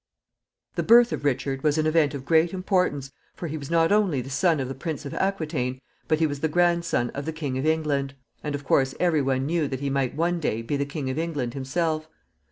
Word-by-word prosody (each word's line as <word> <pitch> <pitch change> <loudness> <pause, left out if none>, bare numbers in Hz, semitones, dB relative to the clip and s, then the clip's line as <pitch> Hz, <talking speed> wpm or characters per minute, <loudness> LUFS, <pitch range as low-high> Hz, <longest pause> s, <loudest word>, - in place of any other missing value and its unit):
] - - -47
The - - +2
birth 235 +1 +6
of - - -3
Richard 135 -1 -1
was 150 +1 +2
an 155 - +1
event 155 -2 +2
of 135 -1 -7
great 165 +3 +3
importance, 180 -7 0 0.2
for - - -6
he 155 - -4
was 140 -3 -6
not 165 0 +3
only 200 -9 +3
the 130 +2 -6
son 160 +2 +2
of 130 - -2
the 135 - -4
Prince 150 +2 -5
of 140 - -5
Aquitaine, 155 -10 -1 0.3
but 155 - +3
he 160 - +2
was 145 -2 -2
the 160 - +1
grandson 170 -5 +1
of 140 0 -5
the 160 - -2
King 150 -5 -4
of 140 - -1
England, 145 -4 0 0.3
and, 150 -1 -2
of 145 - -6
course, 135 -1 +2
every 170 -4 +3
one 135 -1 0
knew 160 0 0
that 130 -2 -4
he 140 0 -2
might 135 -2 0
one 170 +2 0
day 115 -7 -1
be 145 - -2
the 140 0 -1
King 140 -2 -3
of 135 - -3
England 145 -8 -2
himself. 155 +3 -1
150 Hz, 240 wpm, -25 LUFS, 135-165 Hz, 0.3 s, birth